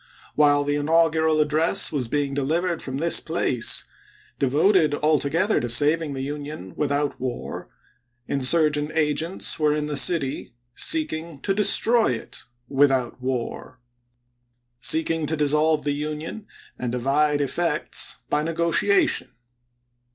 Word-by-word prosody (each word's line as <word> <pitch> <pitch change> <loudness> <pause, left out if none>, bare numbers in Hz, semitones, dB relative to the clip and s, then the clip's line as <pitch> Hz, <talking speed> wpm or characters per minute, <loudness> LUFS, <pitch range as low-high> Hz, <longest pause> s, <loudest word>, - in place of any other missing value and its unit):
While 145 -1 +3
the 145 0 -1
inaugural 160 +1 +2
address 155 +5 +2
was 135 -6 -2
being 140 +2 -1
delivered 165 +5 -1
from 130 0 -5
this 165 +3 +2
place, 160 -7 -1 0.6
devoted 150 +3 +3
altogether 155 +6 +1
to 120 - -3
saving 150 +5 +1
the 135 -1 -4
Union 145 -9 -7
without 145 0 -1
war, 125 -2 -5 0.6
insurgent 150 +2 +2
agents 160 +4 0
were 150 -1 +2
in 150 -1 -2
the 150 -1 -4
city 140 -5 +1 0.2
seeking 165 - 0
to 195 - 0
destroy 220 - +3
it 115 - -6 0.2
without 135 -3 +1
war 130 0 -4 0.5
— 120 0 -47
seeking 160 -1 -1
to 160 - 0
dissolve 150 +1 +2
the 145 - -1
Union, 155 +8 -5 0.3
and 125 -2 -3
divide 145 +4 +1
effects, 150 +2 -1
by 150 - 0
negotiation. 170 - +1
150 Hz, 120 wpm, -23 LUFS, 140-160 Hz, 0.6 s, While